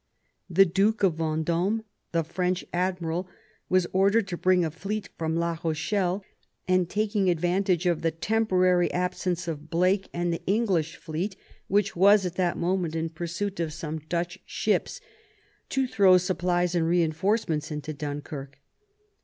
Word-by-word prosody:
The 190 +3 +6
Duke 200 +5 +1
of 175 -5 +3
Venddme, 165 +7 0 0.3
the 165 -1 +1
French 180 +3 -1
admiral, 180 -1 -1 0.4
was 185 -1 +3
ordered 200 +3 +3
to 175 - -2
bring 180 0 +3
a 160 - -2
fleet 200 +6 -4
from 160 0 -2
La 170 0 -1
Rochelle, 180 +4 -1 0.4
and, 185 -1 +2
taking 205 -2 +1
advantage 180 +1 +1
of 175 -3 +1
the 165 - +2
temporary 185 0 +2
absence 180 -1 -1
of 155 -1 -5
Blake 185 +4 +1
and 175 0 -1
the 165 - -5
English 190 -6 +1
fleet, 175 +5 -4 0.3
which 205 +2 +1
was 200 +2 +5
at 180 - -2
that 180 -1 0
moment 175 -2 -1
in 165 0 -1
pursuit 175 +5 -4
of 160 -2 -2
some 160 -1 -5
Dutch 175 +2 -2
ships, - - -1 0.7
to 270 -1 +1
throw 200 -6 +5
supplies 180 -1 0
and 165 -2 +1
reinforcements 165 -1 +1
into 150 0 -5
Dunkirk. 145 -1 -6
180 Hz, 145 wpm, -27 LUFS, 165-190 Hz, 0.7 s, The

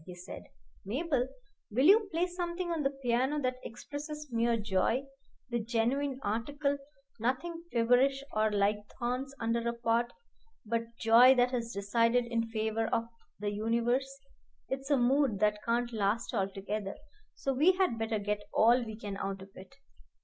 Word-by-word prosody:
he 180 - -8
said. 180 +2 -9 0.4
"Mabel, 260 - 0 0.4
will 250 +6 +2
you 410 +3 +6
play 335 +2 +1
something 350 0 -3
on 330 -2 -1
the 275 - +2
piano 255 +5 +1
that 255 -2 -1
expresses 295 +5 -7
mere 230 0 +2
joy, 215 +4 +1 0.5
the 240 - +1
genuine 250 +5 0
article, 280 +7 -1 0.4
nothing 330 +9 -2
feverish 250 +4 +3
or 215 0 +2
like 205 0 +2 0.2
thorns 255 +2 -2
under 230 +1 0
a - - -2
pot, 235 0 0 0.5
but 230 +1 -3
joy 240 +3 +7
that 245 0 +3
has 235 -2 -2
decided 230 +4 +2
in 230 -1 -1
favor 220 0 -1
of 230 - +1 0.4
the 205 0 -2
universe. 235 +5 0 0.6
It's 270 +1 -4
a 285 - +4
mood 255 -3 +2
that 210 0 +2
can't 240 +1 0
last 215 +2 0
altogether, 195 +1 -2 0.4
so 270 - -1
we 310 +8 +5
had 365 -11 +1
better 225 0 0
get 210 0 -2
all 240 +3 +4
we 220 -2 -7
can 205 -3 -6
out 195 -1 -4
of 195 - -14
it." 190 +8 -13
235 Hz, 155 wpm, -31 LUFS, 220-270 Hz, 0.6 s, joy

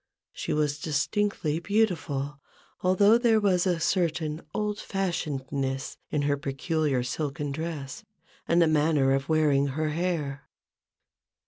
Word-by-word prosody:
She - - -4
was 150 -1 0
distinctly 160 +1 0
beautiful; 165 -8 0 0.4
although 200 +5 +5
there 230 -2 +4
was 190 -3 +2
a 175 -2 +1
certain 160 -3 0
old 210 +3 -2
fashionedness 140 -8 -3
in 150 -1 0
her 145 0 +1
peculiar 140 -1 -1
silken 140 +2 -3
dress, 160 - -5 0.4
and 170 - +3
the 170 - +5
manner 150 -3 +3
of 135 +2 -1
wearing 150 -3 +3
her 155 +3 -1
hair. 150 -4 -2
155 Hz, 120 wpm, -27 LUFS, 140-180 Hz, 0.4 s, although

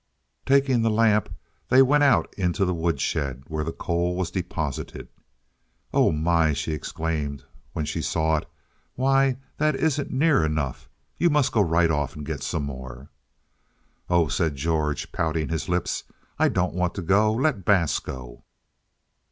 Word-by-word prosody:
Taking 135 -3 +3
the 115 - +2
lamp, 110 -1 +3 0.4
they 130 +2 +7
went 145 +3 +3
out 135 -5 +3
into 95 +1 0
the 90 - 0
woodshed 70 -6 -1
where 80 -2 -3
the 80 - -3
coal 85 +1 -1
was 90 -2 -2
deposited. 85 -6 -4 0.9
"Oh, - - +4
my!" 80 0 +2
she 75 +3 -3
exclaimed 75 -3 -3 0.3
when 80 - -2
she 75 - -3
saw 80 0 +1
it; - - -5 0.5
"why, 135 0 +2 0.2
that 155 -1 +2
isn't 145 -1 0
near 145 - +3
enough. 75 -4 -2 0.3
You 175 - +4
must 150 -3 +2
go 110 - +3
right 85 -2 +3
off 75 -3 -1
and 75 -1 -7
get 75 -2 -4
some 75 +3 -2
more." 65 -1 -8 1.0
"Oh," 85 -2 +3
said 80 0 0
George, 75 +1 -1
pouting 80 -1 -1
his 80 0 -3
lips, 90 -1 -1 0.4
"I - - +4
don't 90 0 0
want 90 -1 -1
to 95 - -4
go. 105 +5 +3
Let 125 -4 0
Bass 90 -5 +3
go." 65 -2 -9
85 Hz, 155 wpm, -25 LUFS, 75-110 Hz, 1.0 s, they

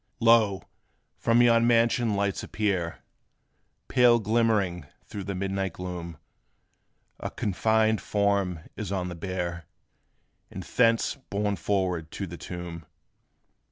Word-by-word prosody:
Lo! 115 -4 +4 0.5
from 115 +1 +3
yon 115 -1 +5
mansion 115 -1 +3
lights 100 -1 -1
appear, 95 -6 -2 0.8
Pale 120 -1 +5
glimmering 105 -7 +1 0.2
through 100 - -7
the 100 0 -4
midnight 95 -1 -2
gloom. 90 -3 -6 1.0
A - - -4
coffined 110 +2 +1
form 100 -5 0
is 105 -3 -5
on 90 -2 -2
the - - -5
bier, 85 -1 -4 0.8
And - - -7
thence 115 +2 +2
borne 100 0 0
forward 90 -6 -1
to 100 - -4
the 85 -1 -8
tomb. 85 -2 -7
100 Hz, 115 wpm, -27 LUFS, 90-110 Hz, 1.0 s, yon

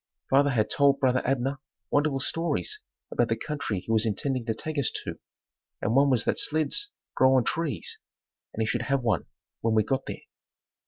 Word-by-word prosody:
Father 140 +2 +5
had 115 -6 +1
told 140 -1 +4
brother 130 -2 +3
Abner 135 +1 0 0.3
wonderful 145 -1 +2
stories 150 - -1 0.3
about 120 - +1
the 115 - +2
country 140 -7 -3
he 115 - -5
was 110 -1 +3
intending 125 +4 -1
to 110 - 0
take 155 +5 -3
us 140 - +1 0.2
to - - -5 0.6
and 110 - 0
one 140 +1 +5
was 125 -4 +3
that - - +1
"sleds 155 - 0 0.2
grow 130 0 +5
on 130 - +4
trees" 160 +3 -2 0.5
and 110 - -1
he - - +1
should 115 +1 0
have 135 +2 0
one 115 -2 +1 0.3
when 115 -1 +1
we 110 - +5
got 135 +5 -1
there. - - -5
130 Hz, 190 wpm, -27 LUFS, 115-140 Hz, 0.6 s, Father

